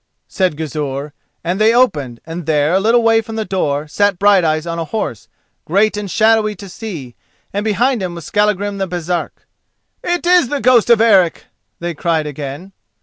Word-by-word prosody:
said 185 -6 -1
Gizur, 145 -2 -4 0.3
and 180 +5 -2
they 225 +2 +4
opened, 145 - +1
and 165 0 -7
there, 150 +1 +2
a 190 - +4
little 230 +4 +3
way 225 0 +4
from 225 0 -8
the 220 -1 -2
door, 150 -6 -1
sat 205 +4 +1
Brighteyes 175 -6 +3
on 170 0 -4
a 165 - -2
horse, 135 - -4 0.4
great 205 +6 +2
and 205 -1 -4
shadowy 215 +2 +2
to 200 - -10
see, 170 - -8 0.4
and 205 +1 -1
behind 235 +3 +1
him 180 -2 -4
was 170 -3 -8
Skallagrim 205 -1 0
the 195 - -1
Baresark. 175 0 -4 0.6
"It 350 0 -1
is 355 -7 +4
the 290 - -1
ghost 250 -3 +4
of 235 -2 +5
Eric!" 195 -7 +3 0.3
they 170 0 -4
cried 160 0 -1
again. 150 +5 -7
190 Hz, 180 wpm, -17 LUFS, 155-220 Hz, 0.6 s, of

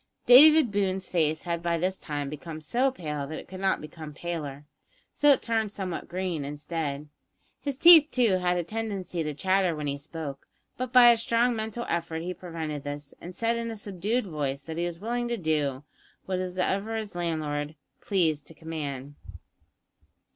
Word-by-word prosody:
David 300 0 +8
Boone's 190 -2 0
face 155 -3 0
had 170 -1 -2
by 170 -1 0
this 185 +3 -1
time 145 -2 -4
become 155 +2 -7
so 245 - +1
pale 150 - -5
that 155 +2 -5
it - - -9
could 185 0 -9
not 195 0 +1
become 155 -1 -9
paler, 150 -4 -5 0.5
so 290 - +4
it 280 - +5
turned 225 -3 0
somewhat 190 -4 -4
green 180 -4 -3
instead. 150 0 -4 0.5
His 280 -3 -3
teeth, 325 -1 +9
too, 230 -9 +2
had 180 0 +1
a 175 - 0
tendency 200 -3 -4
to 150 -2 -3
chatter 185 0 +2
when 150 -1 -4
he 140 0 -2
spoke, 145 -2 -7 0.3
but 255 -1 -4
by 245 -1 +9
a 235 - +3
strong 230 +1 +2
mental 220 +2 -4
effort 165 -1 -2
he 180 +1 -3
prevented 160 -5 -5
this, 145 0 -6
and 180 +1 -9
said 230 0 0
in 230 0 -3
a 225 - -5
subdued 210 +3 -2
voice 145 -5 -3
that 160 +1 -7
he 175 +1 0
was 170 -1 -6
willing 240 +4 -2
to 235 0 -2
do 150 -6 -1 0.4
whatever 185 +3 -1
his 215 -3 -4
landlord 155 -3 -2 0.3
pleased 160 -7 0
to 165 - -13
command. 145 -4 -6
175 Hz, 175 wpm, -27 LUFS, 150-215 Hz, 0.5 s, teeth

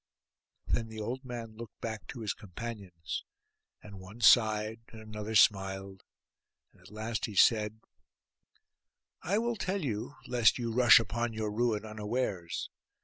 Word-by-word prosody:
Then 115 - -1
the 110 -1 -8
old 125 +5 -4
man 120 -3 -7
looked 115 0 -10
back 110 -2 -5
to 120 - -7
his 105 -3 -1
companions; 95 -5 -7 0.6
and 100 -2 -10
one 95 +5 -12
sighed, 110 -1 +4
and 110 - -12
another 110 0 -6
smiled; 95 -1 +3 0.7
at 95 -1 -18
last 110 +2 -3
he 105 - -8
said, 110 +1 +4 1.4
'I 195 +5 0
will 235 +1 0
tell 190 -2 -2
you, 110 +3 -3
lest 120 -3 +3
you 120 -2 -2
rush 120 -1 +8
upon 115 +2 -2
your 110 -1 -2
ruin 110 -1 0
unawares. 105 -5 -3
110 Hz, 140 wpm, -31 LUFS, 105-120 Hz, 1.4 s, rush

